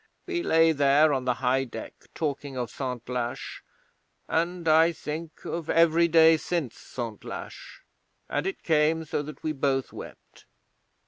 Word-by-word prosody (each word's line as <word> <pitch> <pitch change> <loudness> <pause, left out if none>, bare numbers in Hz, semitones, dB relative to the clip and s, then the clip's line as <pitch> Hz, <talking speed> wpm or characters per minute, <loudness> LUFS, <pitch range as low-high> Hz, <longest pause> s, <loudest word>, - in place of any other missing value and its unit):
We 355 -2 -2
lay 165 - +4
there 145 +1 +4
on 130 -2 -1
the 125 -1 +1
high 130 +2 +3
deck 125 - -8 0.2
talking 140 -3 -3
of 125 -2 -3
Santlache, 125 -2 -4 0.7
and, 170 +1 -1
I 160 +2 +5
think, 160 +1 -7
of 165 -2 -4
every 170 0 +4
day 160 -1 +6
since 155 -7 -3
Santlache, 115 -4 -8 0.4
and - - -1
it 385 - -5
came 160 0 +2
so 150 - -2
that 150 -1 -9
we 155 - 0
both 135 -2 -1
wept. - - -12
155 Hz, 140 wpm, -27 LUFS, 135-165 Hz, 0.7 s, day